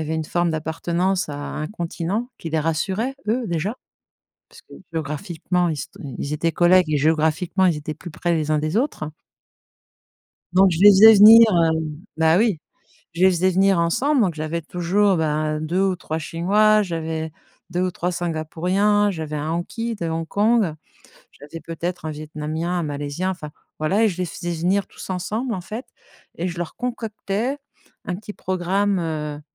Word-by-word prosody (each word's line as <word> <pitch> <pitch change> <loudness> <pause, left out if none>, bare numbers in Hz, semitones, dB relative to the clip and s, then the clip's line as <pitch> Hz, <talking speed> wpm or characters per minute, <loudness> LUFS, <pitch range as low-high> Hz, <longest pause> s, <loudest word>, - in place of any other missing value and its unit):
avait 160 +1 -3
une 160 -1 -2
forme 175 +1 0
d'appartenance 170 +3 -1
à 145 - -5
un 155 +1 -4
continent, 190 +4 -3
qui 165 - -7
les 160 - 0
rassurait 190 - -1
eux, 240 +3 +1
déjà. 185 +7 -2 0.7
Parce - - -17
que - - -16 0.2
géographiquement, 165 +3 -2
ils - - 0
s 150 - -5 0.3
ils 145 - -4
étaient 165 +2 0
collègues 175 -1 +4
et 150 - +2
géographiquement, 160 +5 +2
ils 170 -4 +2
étaient 150 +1 -5
plus 175 +3 -10
près 175 +3 -1
les 155 -2 0
uns 155 - +2
des 155 +5 -2
autres 230 - -1 1.4
donc 190 +1 +6
je 165 - -2
les 205 +2 +9
faisais 215 +3 +9
venir 220 +3 +10
heu 165 -3 +3 0.5
bah 160 +1 +4
oui, 210 -6 +2 0.6
je 170 - -2
les 190 - +7
faisais 185 +1 +2
venir 190 0 +3
ensemble. 255 - +2
Donc, 185 -7 +1
j'avais 155 +2 -3
toujours, 180 +4 +1
bah, 155 -1 0
2 165 +4 -1
ou 190 -2 +1
3 160 -2 -4
Chinois, 205 +7 +3
j'avais 160 -3 -3 0.4
2 180 +1 -1
ou 185 - 0
3 180 0 -2
Singapouriens, 180 +5 +1
j'avais 160 -4 -5
un 150 +2 -3
Hanky 225 +8 -3
de 170 -6 -4
Hong 165 0 -3
Kong, 205 -2 +2 0.6
j'avais 150 +3 -10
peut-être 170 +2 -5
un - - -2
Vietnamien, 155 +2 -4
un - - -1
Malaisien 145 +5 -3
enfin, 165 -5 -7 0.3
voilà, 190 +8 +2
et - - +4
je 180 - -4
les 180 - 0
faisais 175 0 -5
venir 180 +4 0
tous - - -10
ensemble 215 +7 -2
en 185 - -4
fait. 220 +8 -7 0.5
Et 175 - -1
je 175 -1 -6
leur 175 -2 -5
concoctais 235 +1 -3 0.5
un 180 - -3
petit 210 +2 -9
programme 190 +2 0
heu, 150 -3 -4
175 Hz, 175 wpm, -22 LUFS, 160-195 Hz, 1.4 s, venir